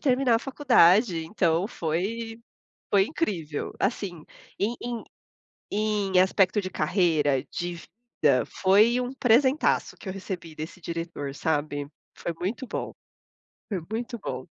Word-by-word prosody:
terminar 255 -2 +3
a - - 0
faculdade, 220 - +4
então 170 0 +1
foi 225 +6 -3 0.5
foi 200 -1 +6
incrível. 175 - -3
Assim, 195 -6 -2 0.3
em 220 +4 0
em 240 -1 -4 0.7
em 205 -3 +1
aspecto 190 +2 +3
de 185 - -4
carreira, 155 -6 +2
de 175 0 -3 0.5
vida, 130 -6 +4
foi 215 +6 +4
um 250 +1 -4
presentaço 260 +3 +3
que - - -11
eu 190 - -3
recebi 185 -4 -6
desse 155 +4 -7
diretor, 165 -4 -4
sabe. 145 -2 -1 0.3
Foi 170 - -3
muito 220 +8 -3
bom. - - -4 0.8
Foi 195 -6 -2
muito 235 +1 -3
bom. 130 -8 -5
190 Hz, 130 wpm, -26 LUFS, 165-230 Hz, 0.8 s, foi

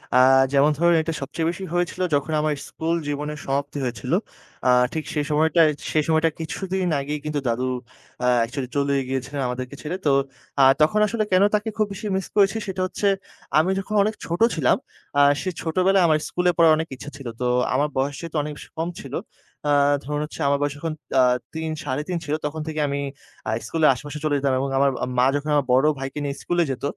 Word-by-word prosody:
আ - - +7 0.4
যেমন 140 +2 +5
ধরুন 170 +2 +4
এটা 165 +1 -3
সবচেয়ে 160 +4 -2
বেশি 175 +3 -5
হয়েছিল 175 +1 -1
যখন 145 +2 -1
আমার 155 0 +1
school 165 +1 -2
জীবনের 150 +1 -3
সমাপ্তি 140 +1 -2
হয়েছিল। 120 -5 -4 0.6
আ - - +5 0.2
ঠিক 160 - -2
সেই 150 -1 0
সময়টায় 160 +1 +4 0.2
সেই 155 - +2
সময়টার 160 0 +2
কিছুদিন 185 +3 -2
আগেই 150 +2 -3
কিন্তু 150 -1 -1
দাদু 120 +2 0 0.6
আ - - +3 0.2
actually 125 +2 -4
চলেই 140 -1 +1
গিয়েছিলেন 135 +2 -3
আমাদেরকে 130 +2 -5
ছেড়ে। 170 +5 -3
তো 145 - +4 0.5
আ - - +7 0.2
তখন 185 +8 +4
আসলে 215 +1 0
কেন 185 +1 +5
তাকে 210 +2 -1
খুব 215 - +3
বেশি 195 - -8
miss 190 - -2
করেছি 200 +1 +4
সেটা 190 -1 -3
হচ্ছে, 200 - -1 0.5
আমি 160 +4 +4
যখন 215 +2 -4
অনেক 215 +2 -1
ছোট 170 +1 -3 0.2
ছিলাম 150 -7 +3 0.4
আ - - +7 0.2
সেই 185 - -3
ছোটবেলায় 185 +3 +3
আমার 155 -1 +4
school 180 - -2
এ - - +5
পড়ার 165 -2 +6
অনেক 160 +1 -2
ইচ্ছা 140 - -9
ছিল। 135 -3 -8
তো - - 0 0.3
আমার 145 +3 +2
বয়স 140 +1 0
যেহেতু 165 -1 -7
অনেক 150 - -4
বেশি - - -12
কম 165 +1 -1
ছিল - - -10 0.6
আ - - +4 0.3
ধরুন 150 +1 -3
হচ্ছে 150 - -11
আমার 140 - +3
বয়স 145 0 0
তখন 160 +1 -3 0.3
আ 130 - +7 0.3
৩ 160 0 -3
৩.৫ 150 +7 -2
ছিল, 145 - -2
তখন 150 +1 -3
থেকে 155 -1 -3
আমি 140 0 -2 0.5
আ - - +1
school 165 - -3
এর - - +7
আশেপাশে 145 +3 -7
চলে 145 -1 +2
যেতাম 140 -1 +1
এবং 135 +1 -1
আমার 140 +1 +4 0.3
মা 125 - +5
যখন 145 +1 -2
আমার 145 -2 +2
বড় 135 +3 +4
ভাইকে 135 +2 -4
নিয়ে 140 0 -2
school 175 - -1
এ - - -1
যেত। 130 - -6
150 Hz, 210 wpm, -23 LUFS, 140-170 Hz, 0.6 s, আ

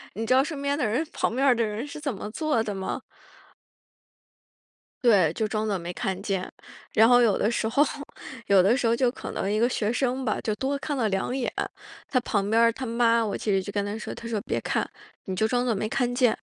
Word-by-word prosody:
你 225 +3 -3
知 255 - +3
道 265 +1 +5
身 300 -3 -5
边 280 0 0
的 295 - 0
人 250 +10 0
旁 - - 0
边 275 +1 +2
儿 250 - +6
的 235 - +1
人 215 +4 -3
是 300 - -8
怎 285 -3 -2
么 210 +1 -6
做 300 -4 0
的 210 -2 -3
吗？ 190 0 -3 2.0
对， 190 -9 +5
就 220 - -1
装 215 +1 -1
作 200 - 0
没 175 0 -5
看 190 0 -3
见。 190 -3 -2 0.4
然 225 +2 +6
后 245 0 +7
有 225 -4 +3
的 215 - +1
时 225 -1 0
候， 275 +6 +4 0.6
有 195 -2 +6
的 205 +6 +4
时 245 -3 +1
候 230 - +3
就 245 0 +2
可 - - -7
能 195 - -2
一 215 - +1
个 235 - +4
学 220 -3 -1
生 260 +1 0
吧， 215 - 0
就 215 -1 -1
多 275 +4 -1
看 290 +1 -3
了 230 -5 +1
2 195 +6 -1
眼， 260 - -1 0.6
他 255 - +2
旁 205 -4 -1
边 225 +1 +3
儿 230 - +5
他 260 +3 -6
妈， 230 0 +3
我 205 - -2
其 210 - -2
实 195 -1 +2
就 195 - -8
跟 205 -1 0
她 205 +2 -4
说 - - -6
她 230 - -8
说： 220 - -1
“别 - - -1
看， - - -1 0.4
你 190 -2 -3
就 220 - +2
装 245 +2 +1
作 235 -3 +1
没 215 +2 -2
看 245 0 0
见。” 245 -3 +3
230 Hz, 260 characters per minute, -26 LUFS, 210-250 Hz, 2.0 s, 后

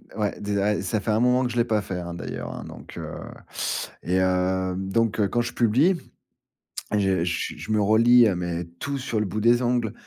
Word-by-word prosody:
Ouais, 105 -2 -1
des 100 0 -2
à, 105 +1 +1
ça 105 +3 -1
fait 110 - -1
un 105 - +2
moment 125 +1 +3
que 125 - 0
je 120 - -5
l'ai 120 - +3
pas 110 -3 +1
fait, 95 -2 -5
hein, 85 0 -6
d'ailleurs, 85 - -6
hein, - - -7
donc, - - -11
heu - - -6 0.9
et 90 +2 +1
heu, 95 0 +1
donc 100 +4 0
heu, 105 - +3
quand 120 +5 0
je 120 - -4
publie, 130 - +3 1.0
je 95 -4 +2
je 85 -1 -2
je - - -6
me 110 - +3
relis, 115 +3 +6
heu, 100 - +1
mais 85 -1 -3
tout 140 0 -3
sur 125 -4 -2
le - - 0
bout 105 +3 -3
des 120 +3 +4
ongles. 120 -3 0
105 Hz, 220 wpm, -25 LUFS, 95-120 Hz, 1.0 s, relis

